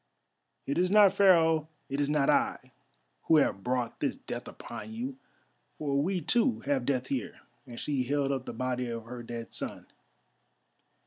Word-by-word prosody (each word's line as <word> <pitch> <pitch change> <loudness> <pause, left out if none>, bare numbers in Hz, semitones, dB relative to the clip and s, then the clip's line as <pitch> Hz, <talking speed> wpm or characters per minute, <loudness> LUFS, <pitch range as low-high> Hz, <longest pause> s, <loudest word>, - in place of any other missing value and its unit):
It 140 - -1
is 180 0 +3
not 205 -1 +7
Pharaoh, 165 -5 +4 0.2
it 140 +1 -2
is 145 - 0
not 150 -2 +2
I, - - +1 0.5
who 160 - +5
have 100 -9 +2
brought 125 -1 -1
this - - 0
death - - -7
upon 120 - -8
you. 255 +4 -5 0.6
For 140 -2 0
we 180 +3 0
too 240 - +2
have 140 -3 -1
death 130 -2 +1
here!" 130 -5 -3 0.3
and 120 -1 -8
she 140 -3 -1
held 140 +2 0
up 130 -2 -2
the - - -3
body 125 -1 -2
of 115 -1 -5
her 120 +1 -7
dead 115 0 -7
son. - - -5
140 Hz, 170 wpm, -30 LUFS, 125-170 Hz, 0.6 s, not